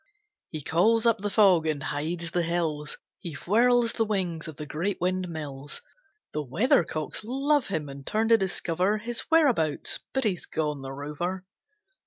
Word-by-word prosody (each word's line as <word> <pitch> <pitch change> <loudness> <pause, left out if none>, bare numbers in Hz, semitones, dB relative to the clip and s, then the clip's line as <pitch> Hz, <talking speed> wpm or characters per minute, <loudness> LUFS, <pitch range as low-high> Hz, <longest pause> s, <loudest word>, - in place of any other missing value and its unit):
He 155 -3 -6
calls 220 - +3
up 230 -3 +4
the 205 +1 -2
fog 190 -6 +5
and 145 -3 -1
hides 165 +3 -3
the 175 - +1
hills, 165 -3 -2 0.2
He 170 - -6
whirls 235 +8 +3
the 225 - +1
wings 180 -7 -2
of 160 - -8
the 150 - -6
great 170 +7 -2
windmills, 160 - -4 0.5
The 150 - -1
weathercocks 155 - +1
love 275 +4 +1
him 160 -6 -2
and 140 0 -9
turn 220 +8 0
to 230 - +7
discover 185 +1 0
His 230 +2 -3
whereabouts 250 - +2
but 265 - 0
he's 195 -6 -1
gone, 150 -3 -2
the 135 0 -6
rover! 150 +7 -4
175 Hz, 160 wpm, -27 LUFS, 155-215 Hz, 0.5 s, to